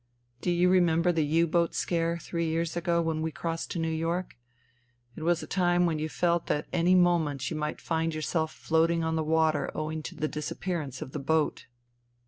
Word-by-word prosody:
" 120 +1 -39
Do - - -1
you 175 +1 +3
remember 175 -1 +4
the 165 -2 +1
U 160 +3 +3
boat 170 +1 +1
scare 170 -1 0
three 170 0 -3
years 165 +1 -1
ago 170 -1 +1
when 160 -1 -1
we 160 0 -1
crossed 165 +1 -4
to - - -4
New 165 -1 -1
York? 165 +3 -2 0.8
It - - -8
was 170 +1 +1
a - - -5
time 175 -2 +2
when 160 -3 0
you 155 +1 -2
felt 170 +1 0
that 150 - 0
at - - -34
any 175 +2 +4
moment 165 -7 +2
you - - -2
might 150 0 -3
find 165 -1 -1
yourself 160 0 -1
floating 165 +1 +1
on 160 0 0
the 160 - +1
water 160 0 +2
owing 155 0 -3
to - - -7
the 155 - -1
disappearance 150 -2 -4
of 130 - -11
the 150 - -4
boat." 155 0 0
165 Hz, 210 wpm, -28 LUFS, 155-170 Hz, 0.8 s, remember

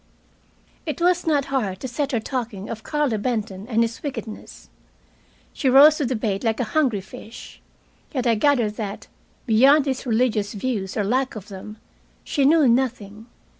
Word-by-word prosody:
It 305 - -3
was 355 0 +2
not 290 -3 +2
hard 200 -8 -1
to - - -3
set 275 +3 -2
her 240 - +1
talking 225 -4 -5
of 220 -1 -6
Carlo 295 -8 -1
Benton 205 -3 -3
and 230 -2 +2
his 230 0 -4
wickedness. 255 -6 -7 0.9
She 270 - 0
rose 290 +4 +7
to 290 - -1
the 255 - -1
bait 210 -2 -2
like 225 -2 0
a - - +1
hungry 260 -10 +2
fish. 215 +4 -12 0.5
Yet 255 -5 -2
I 235 - +4
gathered 225 -3 +1
that, 205 -2 -5 0.4
beyond 270 +5 +5
his 265 -1 -3
religious 220 -3 0
views 205 -3 -3
or 210 - +1
lack 255 +6 0
of 210 -1 -9
them, 205 +2 -9 0.5
she 280 - 0
knew 305 -1 +5
nothing. 230 -3 -1
240 Hz, 170 wpm, -23 LUFS, 215-270 Hz, 0.9 s, rose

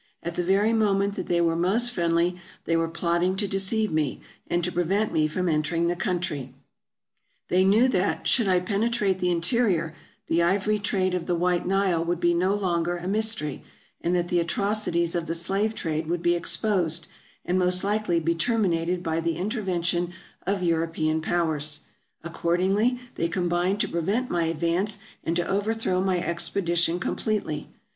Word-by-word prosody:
At 170 - -3
the 175 - -1
very 200 +5 +3
moment 200 -2 +2
that 185 -3 -5
they 170 -1 +2
were 165 -1 +2
most 205 +8 +1
friendly, 170 -2 +1 0.3
they 165 - +1
were 165 0 +1
plotting 170 +2 0
to 200 +1 -1
deceive 195 +2 0
me, 155 -4 0 0.3
and 175 0 0
to 180 - -1
prevent 190 +5 0
me 155 -1 +3
from 180 +4 -2
entering 165 +1 +1
the 175 - 0
country. 160 -8 -3 0.9
They 185 +1 +4
knew 210 +6 +5
that, 195 -5 0
should 230 -5 +3
I 180 -1 +3
penetrate 205 0 0
the 180 - +1
in 170 -1 0
terior, 175 -6 +1 0.3
the 170 - +1
ivory 200 +4 +2
trade 190 -2 0
of 180 -2 -2
the 175 - +1
White 175 +1 0
Nile 190 -3 +2
would 170 0 -1
be 175 -1 +3
no 185 +4 +2
longer 175 -3 0
a 175 +1 -6
mystery, 215 -8 -1 0.4
and 175 +1 +1
that 175 0 0
the 175 - +2
atrocities 170 -1 0
of 170 -1 -2
the 165 - -2
slave 195 +6 0
trade 160 -3 -2
would 170 +1 -2
be 175 0 +4
exposed, 175 -3 0 0.4
and 180 +1 +1
most 180 +1 +2
likely 205 -4 +1
be 165 +1 +1
terminated 180 -4 0
by 160 -1 -1
the 165 0 -1
interven 190 -3 -2
tion 175 0 0 0.3
of 195 -1 0
European 165 -2 0
Powers; 155 -3 -1 0.4
accordingly 190 +8 +1
they 165 - -1
combined 175 +3 0
to - - +1
prevent 200 +10 -1
my 170 -1 +1
advance, 170 +6 0 0.3
and 165 - -1
to 175 0 0
overthrow 205 -2 0
my 190 -1 +1
expedition 170 0 0
com - - -2
pletely. 200 -9 -2
175 Hz, 175 wpm, -25 LUFS, 170-195 Hz, 0.9 s, knew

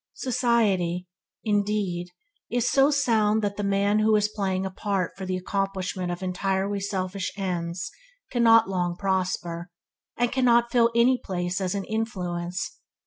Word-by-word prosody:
Society, 205 -8 +1 0.4
indeed 205 -4 0 0.4
is 245 0 0
so 275 +1 +4
sound 220 -6 +2
that 200 -1 -1
the 205 - -3
man 200 +1 +2
who 215 0 +4
is 210 0 +3
playing 190 -2 -1
a 190 - -3
part 195 -2 -1
for 190 -1 -6
the 185 0 -1
accomplishment 190 -1 -2
of 175 +2 -5
entirely 195 +2 -1
selfish 190 -1 -3
ends 175 +3 -3 0.4
cannot 230 -2 +5
long 180 -2 -1
prosper, 180 -3 -1 0.5
and 240 0 +1
cannot 240 -2 +3
fill 235 -1 +4
any 245 +2 +4
place 180 -1 -2
as 185 0 -1
an 200 - -2
influence. 180 -5 -3
195 Hz, 140 wpm, -26 LUFS, 185-220 Hz, 0.5 s, cannot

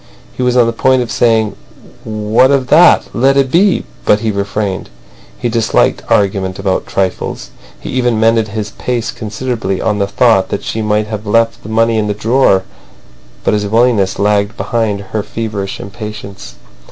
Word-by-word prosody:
He - - -5
was 125 0 +1
on 120 - +5
the 115 - -1
point 130 +2 +2
of 120 - -7
saying 110 -3 +2 0.5
"What 110 +2 +2
of 135 -2 +1
that? 165 +4 +6
Let 135 +3 +2
it 135 -2 +2
be," 190 +3 +3 0.2
but 105 0 +3
he 110 -1 0
refrained. 100 -1 -3 0.5
He - - -2
disliked 115 -1 +1
argument 95 -2 +1
about 95 -1 -1
trifles. 95 -1 -3 0.3
He - - -7
even 120 -3 0
mended 115 0 +3
his 105 0 -5
pace 120 -1 -3
considerably 110 -3 -3
on 105 -1 -1
the 100 - +1
thought 100 -1 +2
that - - -3
she 110 - -3
might 105 0 0
have 105 0 -6
left 115 +2 +1
the 105 - -10
money 115 0 +2
in 105 - -1
the 105 - -2
drawer. 110 -3 +2 0.8
But - - +1
his 105 -1 0
willingness 110 -3 +2
lagged 105 +2 +1
behind 110 -4 -1
her 110 - -1
feverish 105 -3 -5
impatience. 105 -1 -8
110 Hz, 170 wpm, -14 LUFS, 105-120 Hz, 0.8 s, that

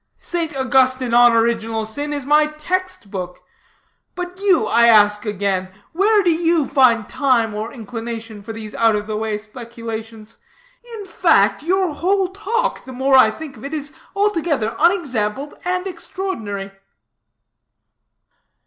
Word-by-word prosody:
"St. 335 -4 -3
Augustine 260 -1 +2
on 240 0 +6
Original 225 -1 0
Sin 285 +7 -4
is 285 -3 -4
my 300 +1 +4
text 305 - -4
book. 180 -3 -6 0.8
But 360 0 -6
you, 380 - +3
I 235 +2 +4
ask 210 -1 +4
again, 195 -2 -1 0.2
where 410 +4 +3
do 350 - +3
you 330 -3 +1
find 250 -6 +3
time 245 -6 +1
or 215 +2 -4
inclination 225 -2 -7
for 220 +3 -8
these 220 -1 -8
out 225 -1 +3
of 210 0 -3
the 215 0 -4
way 215 0 -2
speculations? 225 0 -9 0.6
In 415 -2 -7
fact, - - +2
your 365 +1 0
whole 375 +4 +1
talk, 430 +5 -2
the 260 - -10
more 265 +2 0
I 260 -4 +7
think 275 +4 -9
of 215 - -13
it, 280 +3 -4
is 295 0 -5 0.2
altogether 330 - 0
unexampled 285 - 0
and 365 +1 -1
extraordinary." 285 - -5
255 Hz, 140 wpm, -19 LUFS, 220-335 Hz, 0.8 s, I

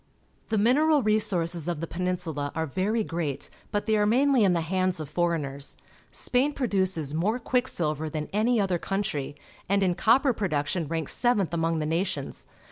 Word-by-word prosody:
The 220 - +1
mineral 285 +7 +4
resources 175 -6 +1
of 170 -3 -2
the 165 - -2
Peninsula 170 -5 -2
are 160 - 0
very 200 - 0
great, 165 -7 -3 0.2
but 205 0 -1
they 220 0 +2
are 210 0 +3
mainly 260 +1 +4
in 195 - +4
the 170 -1 +1
hands 185 +1 0
of 155 - -5
foreigners. 150 -5 -2 0.3
Spain 265 +4 +1
produces 190 - 0
more 195 +9 +1
quick 250 +1 0
silver 155 - -1
than 150 0 -4
any 225 +3 +2
other 185 -4 +1
country, 155 -9 -3 0.3
and 200 0 +3
in 180 -2 +2
copper 250 - +3
production 165 -4 -1
ranks 160 -1 -2
seventh 210 - +1
among 165 0 0
the 155 - -1
nations. 165 -2 -2
180 Hz, 170 wpm, -27 LUFS, 160-215 Hz, 0.3 s, mineral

